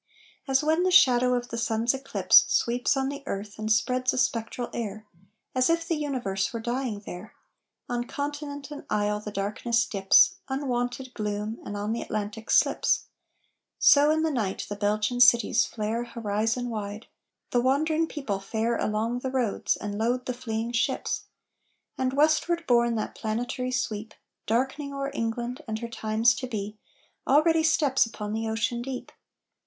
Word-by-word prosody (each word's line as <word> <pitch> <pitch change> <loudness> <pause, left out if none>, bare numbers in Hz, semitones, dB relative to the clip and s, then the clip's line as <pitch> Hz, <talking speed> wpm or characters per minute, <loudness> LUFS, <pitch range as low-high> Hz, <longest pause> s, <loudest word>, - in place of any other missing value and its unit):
As 270 +1 +2
when 315 +3 +2
the 370 - +2
shadow 250 -8 +5
of 245 0 -3
the 230 - -4
sun's 230 +1 +1
eclipse 270 0 +4
Sweeps 245 +3 +1
on 270 0 0
the 280 0 -6
earth, 205 +2 -5
and 215 0 -2
spreads 255 +4 +2
a - - -3
spectral 240 -1 -1
air, 215 -2 -5 0.5
As 255 +2 +2
if 330 0 +1
the 335 - +1
universe 250 - -2
were 230 - -4
dying 240 -2 -3
there, 180 +5 -9 0.5
On 240 0 -2
continent 285 +1 -5
and 295 - -7
isle 210 0 0
the 210 - -7
darkness 215 +4 0
dips, 195 -3 +4
Unwonted 255 -1 -2
gloom, 210 +1 -3
and 205 - -5
on 205 +2 -2
the 235 - -3
Atlantic 215 +1 -5
slips; - - +3 0.7
So 290 +1 +6
in 315 +1 +2
the 320 - +1
night 215 -8 -2
the 205 - -4
Belgian 210 +4 0
cities 235 0 +5
flare 225 +2 -2
Horizon 225 +1 -2
wide; 210 0 -5 0.5
the 245 - +3
wandering 310 +5 +2
people 250 -12 -3
fare 225 +4 -1
Along 220 +3 -1
the 260 - -3
roads, 250 -5 0
and 205 0 -5
load 245 +3 0
the 250 - -2
fleeing 230 -1 -3
ships. 240 +2 -1 0.7
And 260 0 -1
westward 315 +4 +2
borne 235 -1 +3
that 215 - -3
planetary 240 +3 -3
sweep, 220 -4 -3 0.3
Darkening 270 +5 -1
o'er 275 0 -3
England 235 +4 -3
and 220 -1 -2
her 235 +1 -5
times 225 0 +2
to 255 - -4
be, 210 -2 -5 0.5
Already 320 +4 +4
steps 290 -6 +3
upon 210 -2 -6
the 225 0 -2
ocean 230 +2 -1
deep! 255 0 -6
235 Hz, 160 wpm, -27 LUFS, 215-265 Hz, 0.7 s, So